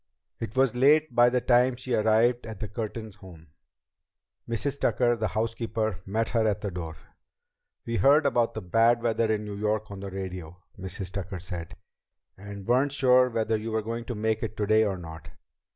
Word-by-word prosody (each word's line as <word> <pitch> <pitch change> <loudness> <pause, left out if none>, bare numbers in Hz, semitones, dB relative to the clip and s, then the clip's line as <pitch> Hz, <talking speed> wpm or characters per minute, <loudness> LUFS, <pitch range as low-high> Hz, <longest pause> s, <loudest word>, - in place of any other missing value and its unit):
It 115 +1 -6
was 130 -2 +3
late 145 +3 +4
by 120 +1 +6
the 125 0 0
time 125 +1 +3
she 130 0 -5
arrived 115 +2 +2
at 110 -3 -8
the 110 - -4
Curtin 110 0 -5
home. 85 -5 -15 1.0
Mrs. 135 +5 -2
Tucker, 120 -1 +2
the 110 -1 -1
housekeeper, 110 0 -2
met 110 +3 -1
her 115 -2 +1
at 105 -1 -1
the 100 - -3
door. 80 -3 -6 0.9
"We 115 0 -2
heard 145 +5 +5
about 120 -4 +1
the 110 - -5
bad 115 +6 +3
weather 115 -1 +1
in 105 -1 -1
New 105 -1 -6
York 110 0 -1
on 100 - -7
the 100 0 -6
radio," 90 -3 -6 0.2
Mrs. 95 0 -5
Tucker 95 -1 -5
said, 85 -2 -7 0.6
"and 100 0 -9
weren't 130 +5 +2
sure 125 -2 +4
whether 115 -1 0
you 110 +1 -5
were 110 0 -1
going 115 +2 -4
to 120 - -5
make 110 +1 -1
it 110 -1 -5
today 110 +1 +3
or 100 -2 -2
not. 80 -3 -10
110 Hz, 185 wpm, -27 LUFS, 100-120 Hz, 1.0 s, by